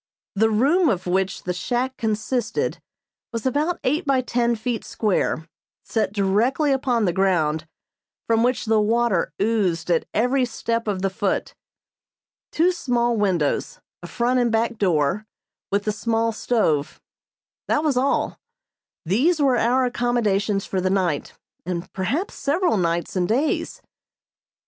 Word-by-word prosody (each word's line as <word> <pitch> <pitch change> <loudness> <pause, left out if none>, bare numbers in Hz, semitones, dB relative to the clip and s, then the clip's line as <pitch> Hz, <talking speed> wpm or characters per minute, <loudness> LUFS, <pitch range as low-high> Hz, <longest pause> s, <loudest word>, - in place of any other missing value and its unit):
The 220 +2 +3
room 290 - +3
of 185 -4 -1
which 190 +1 -1
the 180 - -2
shack 250 +7 -2
consisted 220 +2 -2 0.5
was 230 -1 -4
about 300 +7 0
eight 295 +6 +1
by 275 -3 +2
ten 240 -1 0
feet 230 +1 -3
square, 185 -6 -1 0.4
set 220 -4 -1
directly 215 +9 +1
upon 250 -4 +1
the 175 - +1
ground, 160 -5 +1 0.6
from 225 0 +2
which 250 +1 +1
the 220 -1 +3
water 225 -3 +1
oozed 190 -6 0
at 165 - +1
every 250 +4 +2
step 230 -1 -2
of 195 -2 -2
the 195 - +1
foot. 195 0 -1 1.0
Two 345 +3 +3
small 240 -8 0
windows, 185 -9 0 0.2
a 175 - -8
front 245 +6 +1
and 240 -2 +2
back 230 0 0
door, 180 +2 +1 0.4
with 200 +1 +1
the 215 - 0
small 225 +1 0
stove 210 -11 0 0.7
that 300 - +1
was 300 -4 +1
all. 260 +3 0 0.7
These 270 - +2
were 265 -4 +3
our 255 +3 +2
accommodations 215 -5 0
for 190 - -2
the 185 - +1
night, 185 -6 0 0.3
and 175 0 -5
perhaps 265 - -2
several 330 +3 +1
nights 170 0 -1
and 180 -1 0
days. 295 - -1
225 Hz, 140 wpm, -23 LUFS, 190-250 Hz, 1.0 s, The